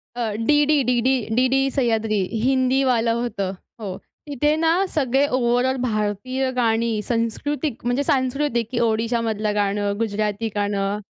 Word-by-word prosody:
अ, 230 -3 -2
DD 295 +1 +3
DD, 250 +1 +2 0.2
DD 265 +2 +2
Sahyadri 225 -5 +1 0.2
हिंदीवालं 260 -2 +2
होतं. 200 -5 -3 0.3
हो. 195 -4 -5 0.3
तिथे 295 +2 +1
ना, 325 +1 +2 0.2
सगळे 270 -1 +2
ओव्हरऑल 250 0 +1
भारतीय 235 +3 -1
गाणी 230 -2 +1
संस्कृतिक 240 +4 -2
म्हणजे 245 +4 +1
सांस्कृतिक, 260 -4 0
की 240 - -1
ओडिशामधलं 225 -2 0
गाणं, 205 0 0
गुजराती 215 0 -1
गाणं. 205 0 -1
235 Hz, 120 wpm, -22 LUFS, 215-265 Hz, 0.3 s, DD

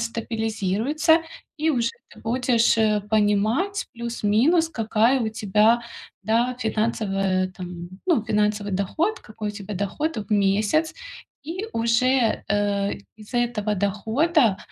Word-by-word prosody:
стабилизируется 230 - 0 0.3
и 315 +1 +1
уже 240 -5 +1 0.2
ты - - -15
будешь, 240 0 +2
э, 215 -1 +3
понимать 215 - +1
плюс-минус, 235 +8 +1
какая 225 0 +2
у 225 - 0
тебя, 220 +2 +2 0.4
да, 230 +4 +1
финансовая 195 -5 0
там, 175 -1 -8 0.2
ну, 325 - +3
финансовый 210 -1 0
доход, 315 - -1
какой 215 0 -6
у - - -1
тебя 205 0 -7
доход 205 - -2
в 210 -1 -6
месяц. 210 +10 +2 0.5
И 360 +6 -4
уже, 235 +1 +2
э, 205 -1 0 0.2
из 215 +3 -14
этого 235 -3 0
дохода, 220 - +1
220 Hz, 120 wpm, -24 LUFS, 205-250 Hz, 0.5 s, э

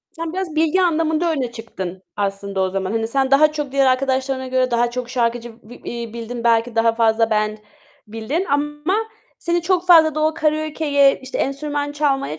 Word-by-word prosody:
Sen 330 0 -5
biraz 370 -4 -4
bilgi 325 +4 +2
anlamında 325 0 +1
öne 255 -5 -2
çıktın 190 -5 -7
aslında 200 -1 -3
o 190 0 +1
zaman. 190 +1 -3
Hani 225 0 -1
sen 270 +1 0
daha 305 +2 +5
çok 295 -3 -4
diğer 275 -1 +3
arkadaşlarına 260 0 0
göre 255 -1 0
daha 240 0 +1
çok 250 0 -5
şarkıcı 240 -1 -1
b 235 +3 -13
iii, 235 -1 -6
bildin 235 +1 -6
belki 230 0 +2
daha 225 0 +3
fazla 225 0 +2
band 215 0 0 0.5
bildin 225 - -3
ama 295 +6 0 0.4
seni 345 0 -1
çok 360 0 0
fazla 320 -3 +6
da 310 - -2
o 310 +1 +1
karaokeye, 305 -3 +1
işte 260 0 -6
enstrüman 290 +1 -2
çalmaya 275 - -1
265 Hz, 180 wpm, -20 LUFS, 230-305 Hz, 0.5 s, fazla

